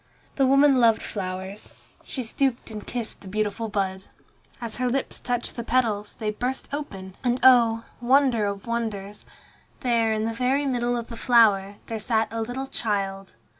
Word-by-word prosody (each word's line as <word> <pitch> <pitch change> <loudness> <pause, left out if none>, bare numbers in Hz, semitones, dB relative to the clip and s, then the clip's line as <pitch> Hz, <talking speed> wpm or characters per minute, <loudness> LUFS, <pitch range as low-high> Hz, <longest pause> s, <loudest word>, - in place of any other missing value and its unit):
The 270 -2 +3
woman 275 0 +5
loved 230 -2 +4
flowers. 190 0 -6 0.3
She 260 - -4
stooped 240 0 -1
and 210 -1 -7
kissed 235 -3 -5
the 195 - -11
beautiful 215 +2 -2
bud. 190 -2 -1 0.6
As 230 -2 -4
her 250 0 0
lips 265 +2 -2
touched 245 -1 -2
the 235 - -4
petals, 225 -4 0
they 215 -1 -1
burst 250 +5 -3
open, 195 -11 -6
and 245 0 +1
oh! 230 -3 +6 0.2
wonder 250 -4 +3
of 200 -1 -4
wonders! 215 -4 -4 0.6
there, 230 -3 +2
in 220 0 0
the 225 - -1
very 260 +5 +1
middle 245 -2 0
of 235 - -5
the 230 - -7
flower, 210 -5 +4
there 225 -1 -4
sat 220 0 +1
a 225 0 -3
little 245 +4 -3
child. 195 - -3
230 Hz, 170 wpm, -25 LUFS, 205-250 Hz, 0.6 s, oh